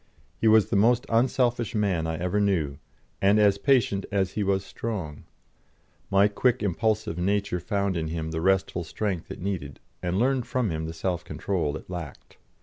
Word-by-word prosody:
He 115 - 0
was 110 -1 +5
the - - +2
most 120 +5 +4
unselfish 120 -1 +1
man 95 -6 +1
I 80 0 -2
ever 90 +4 0
knew, 80 -9 0 0.4
and 100 +2 +4
as 100 -1 +4
patient 115 -7 +2
as 95 -2 +1
he 105 - -3
was 100 -1 0
strong. 95 -10 -5 0.8
My 100 +1 +5
quick, 120 +3 +1
impulsive 105 -2 0
nature 100 0 0
found 100 0 -1
in 80 -1 -2
him 80 0 -4
the 80 0 -2
restful 95 -1 +1
strength 90 +1 -3
it - - -7
needed, 85 -8 -4 0.2
and 90 +1 -1
learned 125 +2 +1
from 125 -7 0
him 80 0 -3
the 80 - -5
self 85 +1 -2
control 85 -4 -2
it - - -13
lacked. 85 -6 -8
95 Hz, 175 wpm, -26 LUFS, 85-110 Hz, 0.8 s, was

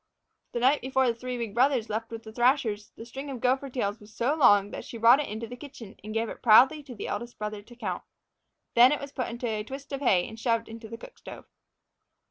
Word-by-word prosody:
The 240 - -1
night 265 +4 +3
before 265 0 +1
the 240 - +2
three 250 +2 -5
big 230 -4 -4
brothers 250 -1 +2
left 225 +2 -3
with 225 0 -8
the 220 - -10
thrashers, 240 -4 +1
the 225 - -9
string 270 +4 -7
of 260 -3 -5
gopher 265 +3 +1
tails 225 -4 -2
was 210 +1 -16
so 245 +6 0
long 205 -9 +5
that - - -6
she 235 - -8
brought 235 +4 +6
it 295 - -3
into 220 +2 -5
the 245 +2 -8
kitchen 250 -6 -11
and 215 - -7
gave 225 +1 -1
it - - -8
proudly 255 +6 +6
to 270 -4 -11
the - - -6
eldest 240 0 -5
brother 210 -1 -5
to 240 +4 -16
count. 200 -7 -4 0.7
Then 245 +2 +7
it 295 - 0
was 280 -1 -8
put 260 -3 -3
into 235 +1 -5
a 215 -2 -2
twist 270 +5 -9
of 275 - -3
hay 185 -9 +3
and 225 - -10
shoved 230 -1 0
into 225 0 -10
the 230 - -7
cook - - -13
stove. - - -10
235 Hz, 250 wpm, -27 LUFS, 220-265 Hz, 0.7 s, Then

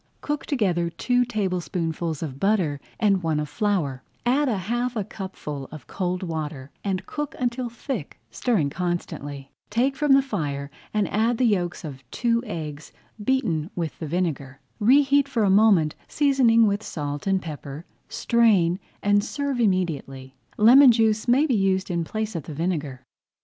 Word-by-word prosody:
Cook 295 -1 -3
together 180 - +1
two 245 +9 +1
tablespoonfuls 175 - -2
of 135 -4 -6
butter 180 -9 +1 0.2
and 200 -4 +3
one 160 -3 0
of 150 - -2
flour, 150 -6 -1 0.2
add 270 +3 +2
a 220 - 0
half 240 +6 -2
cupful 150 -8 -6
of 155 -4 -10
cold 180 -1 -3
water, 155 -5 -5
and 190 -2 -2
cook 295 -1 -5
until 245 0 -1
thick, 260 +4 -6
stirring 190 - 0
constantly. 145 -5 -4 0.2
Take 250 +5 +1
from 295 -1 +3
the 270 0 +5
fire 140 - -3 0.2
and 210 -2 +1
add 225 +3 +1
the 255 - +2
yolks 180 -6 0
of 135 -4 -8
two 235 - +1
eggs 155 -6 -6 0.3
beaten 200 - 0
with 165 -3 -4
the 160 - -4
vinegar. 145 -5 -2 0.2
Reheat 275 +5 +4
for 240 -5 0
a 195 - +3
moment, 195 -7 +5
seasoning 260 -6 +4
with 205 0 +1
salt 145 +1 -5
and 195 -1 +3
pepper, 150 -2 -8 0.2
strain, 200 -7 +3 0.2
and 205 0 +3
serve 280 +2 -2
immediately. 155 - -1 0.2
Lemon 250 +5 +8
juice 220 -1 +2
may 260 +5 +4
be 280 - +1
used 195 -2 +1
in 170 -1 0
place 215 +4 -4
of 160 - -4
the 155 - -7
vinegar. 150 -6 -2
190 Hz, 155 wpm, -24 LUFS, 155-235 Hz, 0.3 s, Lemon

